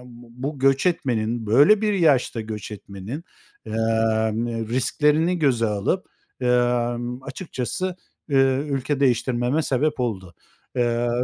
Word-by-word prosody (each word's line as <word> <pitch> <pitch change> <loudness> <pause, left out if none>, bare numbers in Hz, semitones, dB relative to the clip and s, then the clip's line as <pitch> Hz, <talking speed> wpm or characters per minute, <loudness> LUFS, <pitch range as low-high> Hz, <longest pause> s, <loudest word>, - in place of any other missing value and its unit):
bu 125 +4 -7
göç 135 +2 +3
etmenin, 120 -9 0
böyle 145 - +5
bir 210 -1 +1
yaşta 145 - +2
göç 110 -1 -6
etmenin, 105 - -7 0.4
emm, 110 0 0
risklerini 150 +7 +2
göze 130 -7 +2
alıp, 105 - -1 0.4
ımm, 120 0 0
açıkçası, 165 +4 -4 0.4
ııı, 135 0 +3
ülke 140 0 -1
değiştirmeme 125 +2 +1
sebep 145 +1 0
oldu. 95 -8 -3 0.4
Iıı, 120 0 +1
125 Hz, 105 wpm, -23 LUFS, 115-140 Hz, 0.4 s, böyle